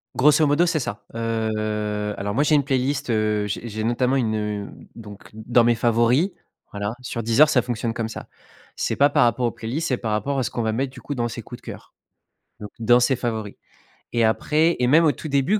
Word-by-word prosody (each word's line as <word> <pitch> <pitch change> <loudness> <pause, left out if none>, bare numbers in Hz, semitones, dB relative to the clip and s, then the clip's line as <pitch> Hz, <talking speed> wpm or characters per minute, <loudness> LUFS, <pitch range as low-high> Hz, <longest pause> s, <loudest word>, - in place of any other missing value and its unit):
Grosso 150 +3 +4
modo, 145 +5 +3
c'est 165 -2 0
ça. 105 -5 -5
Heu, 110 -2 -2
alors 100 +1 -3
moi 140 +5 +2
j'ai 150 0 +3
une 145 - +3
playlist, 135 0 -1
heu, 105 -2 +1
j'ai 110 +3 -4
j'ai 110 0 -4
notamment 125 +3 +1
une 115 -4 0
heu, 105 -1 -3 0.2
donc 105 -3 -12
dans 115 +2 +2
mes 120 - +3
favoris, 120 - +2 0.4
voilà. 100 +1 -3
Sur 120 -2 -4
Deezer 115 +7 +4
ça 130 -5 +3
fonctionne 115 -1 -3
comme 115 -1 -3
ça. 110 - -8 0.5
C'est - - -1
pas 145 +1 +4
par - - +3
rapport 120 +1 +1
aux 120 - +1
playlists, 135 +11 -4
c'est 125 - +1
par 110 -3 -4
rapport 135 +6 -1
à - - 0
ce - - -2
qu'on 120 - -3
va 110 -1 0
mettre, 130 +3 -2
du - - -12
coup, 145 - -5
dans 120 -1 -1
ses - - -6
coups - - -10
de - - -24
cœur, - - -10 0.7
donc 105 - -8
dans 120 +2 +5
ses 130 +2 +2
favoris. 110 -4 -4 0.6
Et 120 -1 +2
après 155 +9 +2
et 125 - +2
même 160 +5 +5
au 150 - +5
tout 155 - -8
début 145 +9 +1
120 Hz, 225 wpm, -23 LUFS, 110-135 Hz, 0.7 s, dans